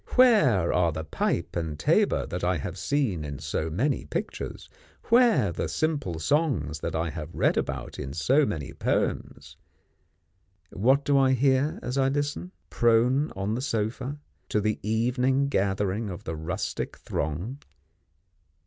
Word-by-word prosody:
Where 205 Hz, -, +5 dB
are 90 Hz, -2 st, +3 dB
the 80 Hz, +1 st, -4 dB
pipe 85 Hz, +2 st, -2 dB
and 80 Hz, -3 st, -3 dB
tabour -, -, +2 dB
that -, -, -5 dB
I -, -, +2 dB
have -, -, -5 dB
seen 125 Hz, -, -1 dB
in 70 Hz, -1 st, -5 dB
so 80 Hz, +2 st, -3 dB
many 125 Hz, -, 0 dB
pictures; 75 Hz, -, -5 dB, 0.4 s
where 230 Hz, -, +5 dB
the -, -, -3 dB
simple 145 Hz, -, -1 dB
songs 80 Hz, -, 0 dB
that -, -, -3 dB
I 80 Hz, 0 st, -1 dB
have 80 Hz, +1 st, -7 dB
read -, -, +2 dB
about -, -, -3 dB
in 65 Hz, -, -5 dB
so 130 Hz, -, +3 dB
many 75 Hz, -, -3 dB
poems? -, -, -2 dB, 1.2 s
What 135 Hz, +8 st, +3 dB
do 140 Hz, -1 st, +4 dB
I 130 Hz, -1 st, +4 dB
hear 135 Hz, +3 st, +2 dB
as 125 Hz, +2 st, -2 dB
I 135 Hz, 0 st, +3 dB
listen, 145 Hz, +5 st, -2 dB, 0.2 s
prone 120 Hz, +5 st, +3 dB
on 95 Hz, +2 st, -2 dB
the 120 Hz, -, -2 dB
sofa, 125 Hz, +3 st, -2 dB, 0.3 s
to 105 Hz, -, +1 dB
the 105 Hz, +1 st, 0 dB
evening 125 Hz, +5 st, +1 dB
gathering 100 Hz, 0 st, 0 dB
of 90 Hz, -, -7 dB
the 80 Hz, -, -4 dB
rustic 90 Hz, +6 st, -4 dB
throng? 85 Hz, -, -4 dB
115 Hz, 150 wpm, -27 LUFS, 85-140 Hz, 1.2 s, Where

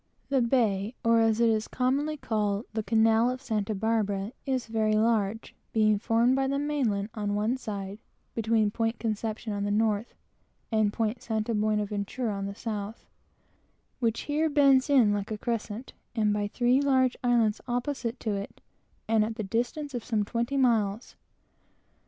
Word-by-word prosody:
The 270 Hz, -2 st, +2 dB
bay, 230 Hz, -3 st, +1 dB
or, 230 Hz, 0 st, +5 dB
as 225 Hz, -1 st, +3 dB
it 230 Hz, -1 st, +4 dB
was 215 Hz, -1 st, 0 dB
commonly 280 Hz, +4 st, 0 dB
called, 210 Hz, -3 st, -1 dB
the 220 Hz, -, -1 dB
canal 225 Hz, +2 st, +3 dB
of 255 Hz, +1 st, -3 dB
Santa 215 Hz, -5 st, -2 dB
Barbara, 205 Hz, -1 st, 0 dB, 0.2 s
is 260 Hz, -3 st, 0 dB
very 220 Hz, -1 st, +1 dB
large, 220 Hz, -1 st, +1 dB, 0.2 s
being 215 Hz, -2 st, +3 dB
formed 235 Hz, +3 st, +3 dB
by 270 Hz, 0 st, +1 dB
the 275 Hz, +1 st, 0 dB
main 290 Hz, -4 st, 0 dB
land 200 Hz, 0 st, -2 dB
on 205 Hz, -2 st, -2 dB
one 215 Hz, +4 st, +1 dB
side, 205 Hz, -5 st, -6 dB, 0.3 s
(between 220 Hz, -2 st, +1 dB
Point 225 Hz, +1 st, -1 dB
Conception 220 Hz, 0 st, -3 dB
on 200 Hz, 0 st, -2 dB
the 205 Hz, -, -1 dB
north 215 Hz, +1 st, 0 dB, 0.6 s
and 215 Hz, -2 st, +2 dB
Point 225 Hz, +1 st, -2 dB
St. 220 Hz, -2 st, -2 dB
Buena 215 Hz, -2 st, +1 dB
Ventura 210 Hz, +3 st, -3 dB
on 195 Hz, 0 st, -3 dB
the 200 Hz, -, -6 dB
south,) 215 Hz, -1 st, -5 dB, 0.9 s
which 230 Hz, -2 st, 0 dB
here 305 Hz, +2 st, 0 dB
bends 280 Hz, -2 st, +4 dB
in 245 Hz, -7 st, +5 dB
like 205 Hz, 0 st, -3 dB
a 215 Hz, -, -3 dB
crescent, 230 Hz, +1 st, -4 dB, 0.2 s
and 210 Hz, -2 st, +1 dB
three 250 Hz, +2 st, +3 dB
large 260 Hz, -3 st, +3 dB
islands 235 Hz, -3 st, +2 dB
opposite 245 Hz, -1 st, -2 dB
to 220 Hz, -, -1 dB
it 200 Hz, 0 st, -5 dB, 0.5 s
and 220 Hz, -1 st, +3 dB
at 220 Hz, +1 st, -3 dB
the 220 Hz, -, -3 dB
distance 245 Hz, +8 st, -2 dB
of 240 Hz, -3 st, -4 dB, 0.2 s
twenty 235 Hz, +5 st, -2 dB
miles. 225 Hz, -4 st, +1 dB
225 Hz, 165 wpm, -28 LUFS, 210-245 Hz, 0.9 s, or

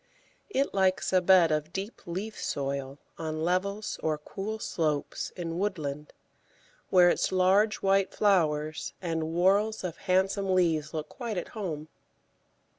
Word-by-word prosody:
It 280 Hz, -7 st, 0 dB
likes 190 Hz, -1 st, +1 dB
a 185 Hz, -, +5 dB
bed 180 Hz, -3 st, +6 dB
of 155 Hz, +1 st, -1 dB
deep 195 Hz, +5 st, -5 dB
leaf 200 Hz, +6 st, -5 dB
soil 140 Hz, -1 st, -3 dB, 0.2 s
on 155 Hz, -1 st, -3 dB
levels 200 Hz, +4 st, -1 dB
or 155 Hz, -1 st, 0 dB
cool 200 Hz, +8 st, -5 dB
slopes 155 Hz, -8 st, -2 dB
in 170 Hz, -1 st, -4 dB
woodland, 150 Hz, -7 st, -3 dB, 0.8 s
where 180 Hz, -1 st, +6 dB
its -, -, 0 dB
large 190 Hz, +4 st, +3 dB
white 195 Hz, 0 st, +3 dB
flowers 155 Hz, -6 st, +1 dB
and 165 Hz, -3 st, -2 dB
whorls 200 Hz, +6 st, +2 dB
of 175 Hz, -2 st, -4 dB
handsome 190 Hz, +1 st, +2 dB
leaves 160 Hz, -4 st, +2 dB
look 155 Hz, -2 st, -4 dB
quite 235 Hz, -6 st, -5 dB
at 175 Hz, -, -4 dB
home. 160 Hz, -8 st, -5 dB
180 Hz, 135 wpm, -28 LUFS, 155-195 Hz, 0.8 s, bed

